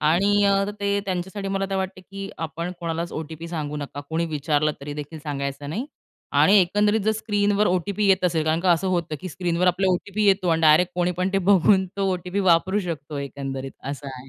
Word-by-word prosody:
आणि 170 +7 +3
अ, 195 0 +3 0.2
ते 200 0 +1
त्यांच्यासाठी 190 +2 -3
मला 195 0 -1
ते - - -1
वाटतं 190 0 -3
की 195 0 -6
आपण 165 +2 -4
कोणालाच 170 0 -3
ओ-टी-पी 160 +1 -6
सांगू 150 -3 -4
नका. 145 -1 -6
कुणी 165 +1 0
विचारलं 150 0 0
तरी 145 +1 -6
देखील 150 +2 -7
सांगायचं 140 -1 -4
नाही. 235 - -3 0.5
आणि 205 +2 +6
एकंदरीत 205 +4 +2
जर 220 - +3
स्क्रीनवर 205 -1 +1
ओ-टी-पी 200 +3 0
येत 190 -1 +3
असेल 165 -3 +1
कारण 160 +1 +1
का 185 -1 +2
असं 170 +3 0
होतं 170 -4 -1
की 185 - -5
स्क्रीनवर 175 +1 -1
आपल्याला 185 +1 +3
ओ-टी-पी 205 +3 -2
येतो 190 -2 +3
आणि 165 0 +2
डायरेक्ट 160 +3 +5
कोणी 180 0 +1
पण 180 +2 -1
ते 195 - +3
बघून 190 0 +4
तो 195 -1 +1
ओ-टी-पी 180 +2 -2
वापरू 190 +1 +3
शकतो. 155 -5 -5
एकंदरीत 135 -1 -5 0.2
असं 145 0 -7
आहे. 130 +1 -12
175 Hz, 200 wpm, -24 LUFS, 155-195 Hz, 0.5 s, आणि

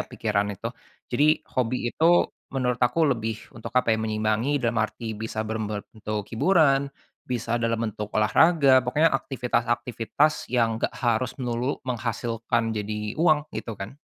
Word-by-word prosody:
pikiran 105 -2 -1
itu. - - -5 0.5
Jadi, 150 +5 +3
hobi 125 0 0 0.2
itu 170 +2 +3 0.2
menurut 125 -2 -1
aku 145 +4 +3
lebih, 110 -2 -3 0.2
untuk 115 - -8
apa 115 -3 +4
ya, 110 - +1
menyimbangi, 110 +5 0
dalam 115 -3 0
arti 110 +1 -3
bisa 110 0 -4
berbentuk 110 -1 -4
hiburan, 140 0 +3 0.4
bisa 120 -1 -1
dalam 115 -1 0
bentuk 105 -1 -4
olahraga, 135 +5 +5
pokoknya 145 +6 +2
aktivitas-aktivitas, 120 +3 0
yang 115 -2 +1
nggak - - 0
harus 120 0 0
melulu 125 +1 -2
menghasilkan 115 -1 -1
jadi 105 +3 -4
uang, 155 -3 +4
itu 115 - -5
kan. 105 +9 -8
120 Hz, 135 wpm, -25 LUFS, 110-130 Hz, 0.5 s, olahraga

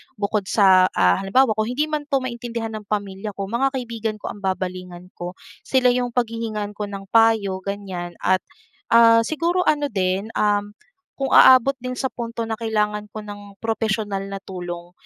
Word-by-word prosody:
bukod 205 -1 -2
sa, 190 -3 +5
ah, 90 0 +4
halimbawa, 245 +6 +3
kung 215 0 0
hindi 295 +6 -1
man 300 -1 -2
'to 275 -3 0
maintindihan 235 -2 -4
ng 215 -2 -8
pamilya 205 0 -4
ko, 200 - -4
mga 235 +7 0
kaibigan 230 -3 -3
ko 210 - -6
ang - - -11
babalingan 185 -2 -4
ko, 175 +1 -7 0.2
sila 255 -2 +2
yung 245 -1 -1
paghihingan 225 -3 -2
ko 210 0 -5
ng 200 -1 -7
payo, 220 -4 +3
ganyan. 190 -3 -6
At, 185 0 +3 0.5
ah, 230 0 +6
siguro 335 +4 0
ano 290 -2 +1
din, 190 +1 -1
um, 205 0 +1 0.5
kung 270 - -1
aabot 260 +1 +7
din 255 0 -3
sa 265 - 0
punto 230 -2 -5
na 220 - -2
kailangan 210 -2 -1
ko 215 - -7
ng 205 -1 -11
propesyonal 215 -3 -1
na 195 - -6
tulong, 175 -2 -7
210 Hz, 170 wpm, -22 LUFS, 195-235 Hz, 0.5 s, aabot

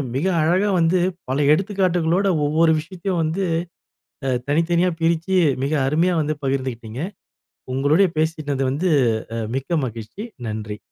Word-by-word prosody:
மிக 140 +6 0 0.2
அழகா 185 +6 +2
வந்து 170 +2 +3 0.3
பல 135 +2 0
எடுத்துக்காட்டுகளோட, 185 0 +1 0.2
ஒவ்வொரு 160 +2 +3
விஷயத்தையும் 180 +1 -3
வந்து 165 +5 -1 0.9
அ - - +2 0.2
தனித்தனியா 170 +4 +2
பிரிச்சு 170 +3 +1 0.3
மிக 145 +3 0
அருமையா 165 +6 +2
வந்து 155 +1 -1
பகிர்ந்து 130 -1 0
கிட்டீங்க. 115 +3 -8 0.7
உங்களுடைய 150 +8 +3
பேசினது 155 -4 -1
வந்து 170 +7 0 0.5
அ - - -1 0.2
மிக்க 160 +5 -1
மகிழ்ச்சி. 115 - -7 0.2
நன்றி. 105 -1 -5
160 Hz, 125 wpm, -21 LUFS, 140-180 Hz, 0.9 s, வந்து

